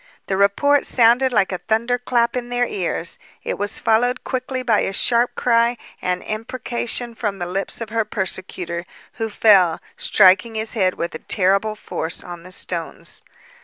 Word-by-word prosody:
The 190 - -1
report 235 +9 +3
sounded 245 +2 +4
like 200 -5 +2
a 185 - -3
thunder 235 +3 0
clap 240 -1 +1
in 245 -1 -3
their 245 0 +1
ears. 175 -5 -3 0.2
It - - -3
was 205 +1 -3
followed 245 +3 +1
quickly 255 0 -3
by 225 -4 +3
a 195 - -1
sharp 240 +4 +1
cry 235 0 +2 0.2
and 180 0 -1
imprecation 240 +1 -3
from 210 -3 -3
the 175 - -3
lips 195 +5 -3
of 225 - -4
her 225 0 +1
persecutor, 180 -3 -4 0.3
who 225 - 0
fell, 195 -6 +4 0.2
striking 205 +3 +4
his 220 0 -2
head 185 -5 +1
with 170 - -4
a 160 - -6
terrible 200 +2 +1
force 165 -5 -4
on 175 -1 -8
the 185 +2 -13
stones. 170 -3 -6
215 Hz, 165 wpm, -21 LUFS, 185-240 Hz, 0.3 s, sounded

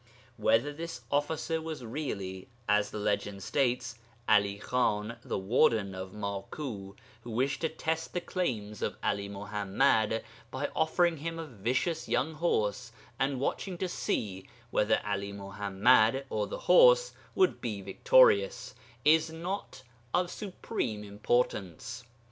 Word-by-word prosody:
Whether 130 +6 +2
this 160 -5 -6
officer 160 +3 0
was 160 -6 -6
really 100 -8 -4 0.2
(as 105 0 +3
the - - -6
legend 100 -1 -1
states) 125 -4 0 0.3
'Ali 100 -2 +4
Khan, 115 -1 0
the - - -3
warden 105 -1 +2
of 95 0 -6
Maku, 100 +1 -5 0.3
who 120 - -10
wished 130 +5 0
to 160 - +1
test 160 0 -2
the 180 - 0
claims 115 - -3
of - - -2
'Ali 100 0 0
Muḥammad 105 +3 +1 0.3
by 130 +4 -3
offering 170 +1 +2
him 165 +3 -4
a 165 - -4
vicious 130 - -1
young 150 +5 +1
horse 125 -7 0 0.3
and 135 -1 0
watching 180 +6 -2
to 185 - -1
see 95 - -3 0.2
whether 105 - +3
'Ali 100 -1 -2
Muḥammad 100 +5 +3
or 105 -1 0
the - - -6
horse - - +6 0.2
would 375 -1 +3
be 105 -5 -3
victorious, - - +4 0.3
is 160 +1 +5
not 170 -3 -5 0.3
of 180 0 +1
supreme 180 - -4
importance. 105 0 -1
120 Hz, 130 wpm, -30 LUFS, 105-160 Hz, 0.3 s, horse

